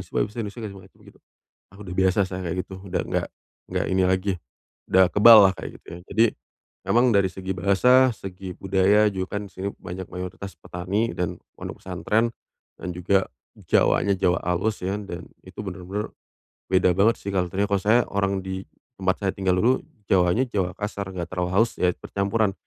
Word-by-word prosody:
sih - - -25
pake - - +3
bahasa 115 - -11
Indonesia." 105 +3 -7
Dari 100 -2 -6
mereka 95 0 -17
begitu, - - -18 0.5
ah, 100 - -17
udah 90 -3 -7
biasa 95 +1 +2
saya 95 0 -6
kayak 85 +2 -2
gitu, 95 - -9
udah 95 -2 -2
enggak - - -1 0.4
enggak - - -1
ini 95 0 +2
lagi, 95 +2 +1 0.6
udah 95 0 +6
keballah 105 -2 +8
kayak - - -8
gitu - - -28
ya. - - -11
Jadi, 110 +3 +5 0.6
emang 120 +2 +4
dari 100 -2 +3
segi 95 +1 -6
bahasa, 125 +8 +4
segi 95 -2 -8
budaya 95 +2 +3
juga 95 +2 -3
kan 105 - -5
di - - -27
sini 95 +2 -4
banyak 90 +1 -7
mayoritas 90 +2 -7
petani 95 +6 -2
dan 90 -1 -3 0.2
pondok - - -8
pesantren. 110 +6 0 0.4
Dan 90 - -5
juga 95 +2 +1 0.3
Jawanya 100 - +2
Jawa 90 -1 +2
halus 90 +4 -1
ya 95 +3 -1
dan 90 -3 -8
itu 95 +3 -8
bener-bener 95 +2 -5 0.6
beda 90 -1 +4
banget 110 +4 +3
sih 100 0 -5
culture-nya. 95 +2 0
Kalau 100 -1 0
saya 110 +4 +5
orang 100 -1 0
di 95 0 -4 0.4
tempat 95 0 0
saya 95 -2 0
tinggal 95 -2 +1
dulu 125 +5 +3 0.3
Jawanya, 90 +6 +3
Jawa 95 -6 -1
kasar 100 -1 -4
enggak 90 -3 -4
terlalu 90 -1 -1
halus 115 +2 +3
ya 90 - +4
percampuran. 100 +1 0
95 Hz, 185 wpm, -24 LUFS, 90-105 Hz, 0.6 s, keballah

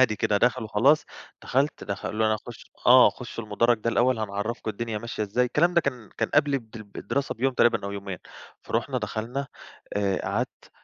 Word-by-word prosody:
هادي 110 -5 +4
كده 105 - +1
داخل 120 +3 +2
وخلاص 125 +8 +3 0.4
دخلت 140 +4 0
د 100 - -2
خلّوني 110 +2 0
أخُش، 110 +2 -10 0.2
آه، 125 +1 +8
خُش 120 -2 -10
المُدرج 115 +2 +2
ده 115 +2 -1
الأول 120 +1 +2
هنعرّفكم 110 +2 -3
الدنيا 110 +1 -4
ماشية 115 0 -4
إزاي 105 +5 +1
الكلام 170 +8 +2
ده 170 - +6
كان 125 -7 -4
كان 115 - +1
قبل 145 -2 +4
الد 115 -4 -5 0.2
الدراسة 140 0 -2
بيوم 135 +3 0
تقريبًا 115 -4 +3
أو 100 - -4
يومين 100 -3 -5 0.4
فرُحنا 120 +3 -1
دخلنا 115 +5 -3 0.5
آآ 100 -2 +1
قعدت 105 +6 -3
115 Hz, 175 wpm, -26 LUFS, 105-130 Hz, 0.5 s, آه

